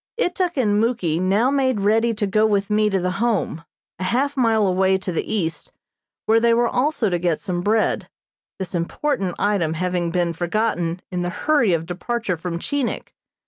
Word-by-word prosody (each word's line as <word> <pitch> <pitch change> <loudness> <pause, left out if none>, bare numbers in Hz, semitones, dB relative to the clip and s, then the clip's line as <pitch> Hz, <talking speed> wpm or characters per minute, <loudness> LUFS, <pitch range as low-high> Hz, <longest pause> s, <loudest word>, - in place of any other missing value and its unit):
Ituk 360 -6 0
and 210 -5 +2
Muky 205 -9 0
now 200 +8 +2
made 260 -6 +1
ready 225 +3 +3
to 210 -2 -1
go 215 +2 +2
with 200 -1 0
me 210 0 +3
to 195 -2 +1
the 180 0 -1
Home, 210 -8 0 0.4
a - - -3
half 270 +8 0
mile 225 -5 +3
away 190 0 +2
to 185 -1 -5
the 165 - -3
east 175 -7 -2 0.5
where 225 +1 +4
they 230 0 +3
were 240 0 +3
also 250 -4 0
to 175 - 0
get 170 -2 0
some 180 -3 -3
bread, 215 +3 +1 0.5
this 190 -1 -5
important 185 - -1
item 190 -6 0
having 180 0 -1
been 170 -1 0
forgotten 175 -1 -1
in 180 -1 -2
the 175 - -1
hurry 265 - +2
of 165 -1 -1
departure 185 +3 -2
from 170 +1 -4
Chinik. 280 +7 -3
200 Hz, 185 wpm, -22 LUFS, 180-235 Hz, 0.5 s, where